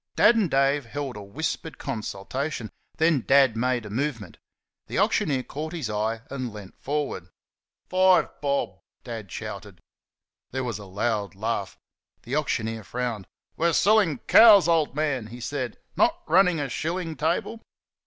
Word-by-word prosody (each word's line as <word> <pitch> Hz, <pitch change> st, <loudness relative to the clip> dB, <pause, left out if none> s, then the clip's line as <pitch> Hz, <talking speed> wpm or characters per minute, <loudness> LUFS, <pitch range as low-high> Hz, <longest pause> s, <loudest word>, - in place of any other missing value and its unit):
Dad 235 Hz, -, +6 dB
and 210 Hz, -6 st, +2 dB
Dave 140 Hz, -1 st, +2 dB
held 140 Hz, +1 st, -5 dB
a 105 Hz, -, -7 dB
whispered 155 Hz, +9 st, -4 dB
consultation; 115 Hz, +4 st, -4 dB, 0.3 s
then 160 Hz, -4 st, +3 dB
Dad 135 Hz, -2 st, +4 dB
made 120 Hz, 0 st, 0 dB
a 105 Hz, -, -8 dB
movement. 115 Hz, -, -3 dB, 0.5 s
The -, -, -4 dB
auctioneer 135 Hz, -4 st, +1 dB
caught 155 Hz, +5 st, -6 dB
his 145 Hz, -11 st, -3 dB
eye 110 Hz, +2 st, -1 dB
and 130 Hz, -3 st, -4 dB
leant 105 Hz, -3 st, -11 dB
forward. 140 Hz, -, -3 dB, 0.6 s
"FIVE 185 Hz, 0 st, +4 dB
BOB!" 140 Hz, -10 st, -1 dB, 0.2 s
Dad 110 Hz, -6 st, -7 dB
shouted. -, -, -7 dB, 0.7 s
There 130 Hz, +1 st, -3 dB
was 115 Hz, -5 st, -3 dB
a 100 Hz, -, -9 dB
loud 100 Hz, +1 st, -2 dB
laugh. 105 Hz, -1 st, -3 dB, 0.5 s
The -, -, -3 dB
auctioneer 110 Hz, -1 st, -1 dB
frowned. 115 Hz, -1 st, -4 dB, 0.3 s
"We're 170 Hz, +1 st, +1 dB
selling 200 Hz, -8 st, +4 dB
COWS, 210 Hz, -5 st, +8 dB
old 160 Hz, -5 st, +2 dB
man," 140 Hz, -7 st, -1 dB
he 120 Hz, +2 st, -10 dB
said, 130 Hz, 0 st, -4 dB, 0.2 s
"not 340 Hz, +1 st, +2 dB
running 180 Hz, -4 st, +4 dB
a 145 Hz, -, -1 dB
shilling 165 Hz, +5 st, -3 dB
table." 170 Hz, +9 st, -1 dB
135 Hz, 145 wpm, -25 LUFS, 110-160 Hz, 0.7 s, COWS